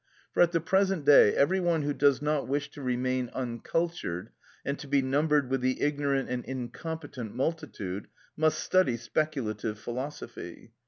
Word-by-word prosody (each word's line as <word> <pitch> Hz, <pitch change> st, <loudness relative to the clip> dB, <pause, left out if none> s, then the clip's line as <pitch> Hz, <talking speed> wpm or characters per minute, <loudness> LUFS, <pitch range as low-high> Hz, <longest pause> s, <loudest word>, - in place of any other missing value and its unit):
For -, -, +3 dB
at 175 Hz, -1 st, +5 dB
the 170 Hz, -, +2 dB
present 190 Hz, -1 st, +1 dB
day 140 Hz, -7 st, +7 dB
every 185 Hz, +7 st, +3 dB
one 170 Hz, -4 st, +1 dB
who 145 Hz, 0 st, 0 dB
does 140 Hz, 0 st, +3 dB
not 150 Hz, -1 st, 0 dB
wish 145 Hz, +2 st, -1 dB
to 145 Hz, -, -10 dB
remain 130 Hz, -1 st, 0 dB
uncultured, 120 Hz, -, -2 dB, 0.3 s
and 140 Hz, +1 st, -2 dB
to 145 Hz, -, -8 dB
be 140 Hz, -1 st, +2 dB
numbered 145 Hz, +1 st, +2 dB
with 135 Hz, -1 st, +1 dB
the 130 Hz, 0 st, 0 dB
ignorant 140 Hz, -2 st, +1 dB
and 125 Hz, -1 st, -3 dB
incompetent 130 Hz, -1 st, -6 dB
multitude, 105 Hz, -, -3 dB, 0.3 s
must 155 Hz, 0 st, +2 dB
study 185 Hz, -11 st, +3 dB
speculative 115 Hz, -5 st, -2 dB
philosophy. 130 Hz, +6 st, -7 dB
140 Hz, 155 wpm, -29 LUFS, 125-155 Hz, 0.3 s, day